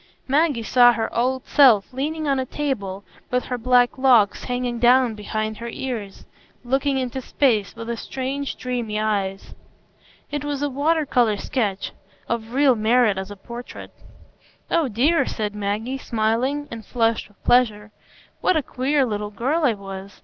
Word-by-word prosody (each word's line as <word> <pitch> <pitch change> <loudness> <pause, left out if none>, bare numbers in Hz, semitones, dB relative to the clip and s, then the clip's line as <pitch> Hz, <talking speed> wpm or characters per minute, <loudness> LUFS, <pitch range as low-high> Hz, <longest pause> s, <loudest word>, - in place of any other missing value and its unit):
Maggie 285 -3 +2
saw 245 +1 +6
her 225 -1 -3
old 255 +2 0
self 250 -7 +5
leaning 305 +4 -2
on 275 -1 +1
a 260 - -1
table, 200 -11 -3 0.3
with 250 0 0
her 250 - -3
black 245 +2 +3
locks 240 -6 +4
hanging 245 -1 -2
down 245 0 +4
behind 215 +1 -4
her 235 0 -6
ears, 230 -6 -6 0.4
looking 270 +2 0
into 260 0 -3
space, 235 -6 +1
with 230 0 -5
strange, 270 +1 -4
dreamy 240 -4 -3
eyes. 200 -3 -2 0.8
It 290 -1 -3
was 290 -1 -3
a 290 - -1
water 305 +4 +1
colour 235 -6 +2
sketch, 200 -3 -2 0.4
of 230 +1 -3
real 275 -1 +5
merit 220 -2 +2
as 190 +1 -6
a 205 - -8
portrait. 235 +5 -9 0.8
"Oh 330 -4 +2
dear," 265 +9 +2
said 210 -2 -3
Maggie, 210 +6 -3
smiling, 245 +6 -1
and 230 -1 -7
flushed 230 +1 0
with 205 - -28
pleasure, 215 -4 +2 0.5
"what 370 - +2
a 305 - 0
queer 270 +3 0
little 210 -3 -3
girl 265 +11 -1
I 235 -5 +3
was! 195 0 -9
245 Hz, 155 wpm, -22 LUFS, 215-265 Hz, 0.8 s, saw